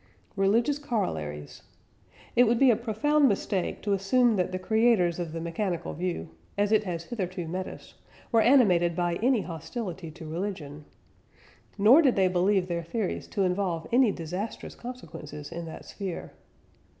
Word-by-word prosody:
" - - -35
RELIGIOUS 230 +9 +2
COROLLARIES. 80 - -3 0.7
It 245 - +6
would 235 +1 +2
be 265 0 +6
a - - +3
profound 270 +6 +2
mistake 195 -2 -2
to 205 - +1
assume 225 +5 +3
that 185 -1 0
the 185 - -2
creators 200 -3 +2
of 170 -2 -3
the 165 - -4
mechanical 170 +2 -3
view, 170 - -3 0.3
as 205 +1 +1
it 215 -1 +3
has 170 -3 -3
hitherto 185 -4 -4
met 185 +3 -3
us, - - -11 0.4
were 230 -2 +5
animated 185 -10 +4
by 175 -1 0
any 245 -2 +3
hostility 180 - -6
to 160 +1 -11
religion. 155 -4 -5 0.9
Nor 225 +10 +7
did 270 -6 +3
they 190 -1 +3
believe 185 +1 +2
their 170 -1 -2
theories 190 +4 -3
to 200 - -1
involve 180 -3 -1
any 245 -2 +5
disastrous 180 +6 -5
consequences 165 - -9
in 170 0 -5
that 160 - -9
sphere. 190 -4 -6
190 Hz, 160 wpm, -27 LUFS, 170-225 Hz, 0.9 s, Nor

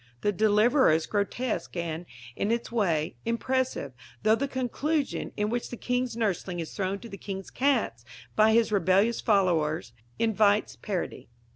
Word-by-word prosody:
The 205 - +2
Deliverer 215 - +4
is 160 0 +1
grotesque 215 +4 -2
and, 170 0 -3 0.3
in 200 - -1
its 235 0 -1
way, 165 - 0
impressive, 250 - -1 0.3
though 215 - +5
the 275 +5 +1
conclusion, 275 +3 -1
in 210 +1 0
which 240 0 -2
the 245 - -6
King's 250 -1 -1
nursling 190 -5 -1
is 165 - -5
thrown 195 0 -1
to 235 - -8
the 195 -3 -9
King's 195 -1 -6
cats 255 - +1 0.3
by 220 +1 +5
his 230 -1 +3
rebellious 200 +4 +3
followers, 165 - +1 0.2
invites 215 -2 +2
parody. 190 - -4
215 Hz, 150 wpm, -28 LUFS, 185-235 Hz, 0.3 s, though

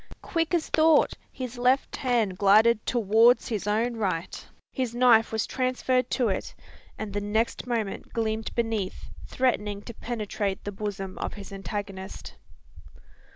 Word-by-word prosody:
Quick 330 +1 0
as 330 - 0
thought, 315 -1 +4 0.2
his 250 -2 -6
left 255 +2 +2
hand 235 -7 +1
glided 210 +3 +5
towards 230 +2 +4
his 210 -3 -3
own 230 +3 0
right; 185 -5 -2 0.3
his 250 -3 -3
knife 240 -2 +5
was 220 -1 0
transferred 255 0 0
to 250 -3 +1
it; 190 - -3 0.4
and 215 -2 -5
the 205 - -1
next 220 +4 -1
moment 225 -5 -3
gleamed 220 -1 -1
beneath, 225 -5 -2 0.2
threatening 210 -5 0
to 235 - -8
penetrate 210 -4 -3
the 205 - -4
bosom 195 -2 -5
of - - -4
his 200 -1 -9
antagonist. 195 -1 -6
220 Hz, 140 wpm, -27 LUFS, 205-245 Hz, 0.4 s, glided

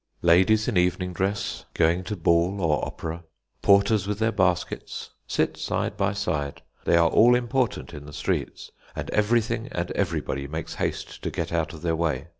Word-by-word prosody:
Ladies 95 +6 +5
in 120 -7 +1
evening 90 +1 +1
dress, 95 +3 -2
going 85 +3 +2
to 105 - -3
ball 85 +2 +2
or 80 -5 +1
opera, 80 +2 -5 0.4
porters 100 0 +4
with 105 -1 -1
their 110 +1 +1
baskets, 90 -4 -1 0.2
sit - - 0
side - - -2
by 100 -1 +1
side. 80 -8 -3 0.2
They 85 - +4
are 85 -1 +5
all 120 +3 +6
important 125 -5 -1
in 75 -1 -9
the - - -9
streets, - - -3 0.2
and - - -5
everything 110 +1 +1
and - - -3
everybody 70 +1 -2
makes 80 +2 -5
haste - - -4
to - - -2
get 85 0 -4
out 80 -2 0
of 80 -1 -11
their 85 -1 +1
way. 80 -2 -1
90 Hz, 175 wpm, -25 LUFS, 80-105 Hz, 0.4 s, all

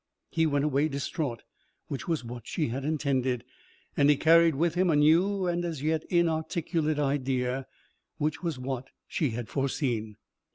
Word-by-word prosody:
He 160 -1 +2
went 145 -1 +1
away 145 +1 +2
distraught, 140 - -3 0.4
which 140 - -5
was 165 -6 0
what 120 -1 -8
she 155 -7 -1
had 130 +4 -3
intended, 135 -5 0 0.5
and 145 0 +4
he 145 - +5
carried 165 0 +5
with 165 +3 +1
him 180 +1 +2
a 160 - +4
new 175 +6 +4
and 175 0 0
as 160 -5 -4
yet 155 0 +1
inarticulate 160 -2 0
idea, 135 -2 0 0.5
which 150 +1 -1
was 165 -6 -2
what 130 0 -4 0.2
she 150 - 0
had 115 0 -4
foreseen. 125 -6 -2
150 Hz, 160 wpm, -28 LUFS, 130-160 Hz, 0.5 s, he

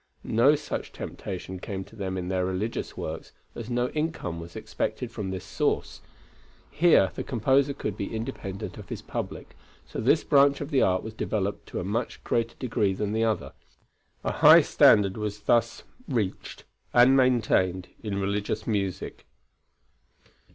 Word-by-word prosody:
No 120 +7 +4
such 150 0 -5
temptation 95 0 -6
came 95 +1 -5
to 115 - -17
them 95 -3 -3
in 90 -1 -4
their 95 0 0
religious 95 +5 -3
works, 80 +1 -6 0.2
as 115 0 -7
no 120 +1 0
income 150 - -3
was 85 0 -10
expected 125 -2 -3
from 105 -4 -4
this 95 -1 -5
source. - - -1 0.7
Here 150 - +4
the - - -4
composer 135 +4 +2
could 105 -1 -4
be 100 - -4
independent 100 -3 -5
of - - -11
his - - -6
public, - - -6 0.3
so - - -5
this - - +3
branch 140 0 +4
of 145 +1 -5
the 135 - +3
art 90 0 +2
was 110 - -7
developed 100 -2 -2
to - - -4
a - - -3
much 110 +6 -3
greater 115 0 -1
degree 110 -6 0
than 105 +2 -2
the 110 +1 +2
other. 110 -2 -1 0.7
A - - 0
high - - +8
standard 100 -1 +5
was 105 -1 -4
thus 115 +2 +1 0.2
reached 110 -8 -3 0.3
and 125 +2 +7
maintained 110 -8 +2
in 100 -3 -3
religious 100 +2 -2
music. 100 -4 -3
105 Hz, 160 wpm, -27 LUFS, 95-120 Hz, 0.7 s, high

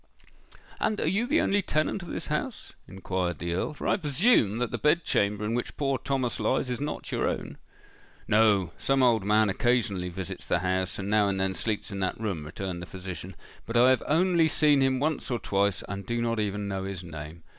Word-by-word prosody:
"And 215 -1 0
are - - 0
you 200 +8 +1
the 300 +5 +3
only 205 +1 +2
tenant 155 +2 -1
of 175 - -9
this - - -4
house?" 155 - -4
inquired 95 -2 -3
the 85 0 -3
Earl; 150 - -2
"for - - -5
I - - +3
presume 150 - +3
that 125 -1 -1
the - - -3
bed 150 +3 +3
chamber 105 -3 0
in 110 - -1
which 120 - -3
poor 135 -3 0
Thomas 130 -2 -1
lies 125 +3 0
is 125 - -3
not 150 - -4
your - - 0
own." - - -5 0.7
"No: 105 -5 +3
some 135 -1 +2
old 115 -5 +4
man 105 +2 +3
occasionally 100 -4 0
visits 90 0 -6
the - - +2
house, 95 0 -1
and 95 - -4
now 105 0 +3
and 95 -1 -1
then 95 0 0
sleeps 110 +1 -2
in 100 - -4
that 95 +1 -2
room," 95 -9 -3
returned 90 +2 -5
the 90 - -7
physician. 95 -1 -7 0.3
"But 115 +1 0
I 125 +2 +6
have 130 - +2
only 170 +1 +3
seen 150 -2 +4
him 135 -1 +2
once 155 +1 -1
or 120 - 0
twice 100 -3 0
and 100 +1 -5
do 120 +4 -2
not 115 -1 0
even 105 -1 -2
know 95 -1 -3
his 95 -2 -5
name. 80 -1 -9
110 Hz, 215 wpm, -27 LUFS, 95-135 Hz, 0.7 s, I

